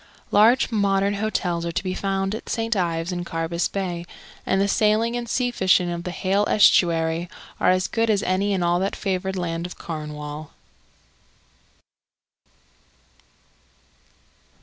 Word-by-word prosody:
Large 230 +6 +4
modern 200 -2 +1
hotels 195 -5 -1
are 170 - -2
to 170 - -2
be 185 -1 -2
found 195 0 -1
at 220 - -7
St. 225 0 -1
Ives 170 -2 -1
and 175 -1 -3
Carbis 165 0 -2
Bay, 180 -3 -3 0.4
and 190 - +2
the 200 - +2
sailing 215 +3 +2
and 240 -1 -4
sea 245 +1 0
fishing 185 -5 +2
of 170 0 -5
the - - -2
Hayle 195 +3 0
Estuary 170 -4 +3 0.3
are - - +3
as 185 0 +2
good 225 0 0
as 205 -2 +2
any 190 +2 0
in 190 -3 0
all 175 0 +2
that 195 +2 -1
favoured 190 0 -2
land 170 -1 -3
of 180 - -11
Cornwall. 150 -1 -7
185 Hz, 145 wpm, -23 LUFS, 170-205 Hz, 0.4 s, Large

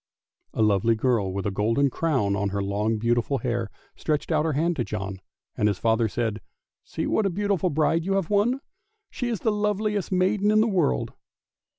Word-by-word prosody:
A 110 - +2
lovely 105 +2 +3
girl 110 -4 +1
with 95 0 -4
a 100 - 0
golden 115 +8 +1
crown 130 -13 0
on 100 0 -1
her 100 0 -2
long, 105 +3 0
beautiful 120 +4 +1
hair, 120 -3 -2 0.3
stretched 150 +1 -2
out 155 -1 +2
her 160 - 0
hand 165 +5 +1
to 120 - +1
John, 95 -3 -5 0.3
and 105 - +2
his 100 -3 0
father 115 +1 +2
said, 110 -1 -2 0.2
" - - -67
See - - -4
what 215 - +1
a - - 0
beautiful 195 -1 0
bride 160 +2 +1
you 195 +3 -1
have 195 -2 -1
won. 230 +6 +2 0.5
She 245 - -3
is 225 -6 -3
the 220 - +2
loveliest 210 -1 -1
maiden 195 +3 +2
in 215 0 +4
the 220 - +4
world." 175 - 0
135 Hz, 200 wpm, -25 LUFS, -, 0.5 s, in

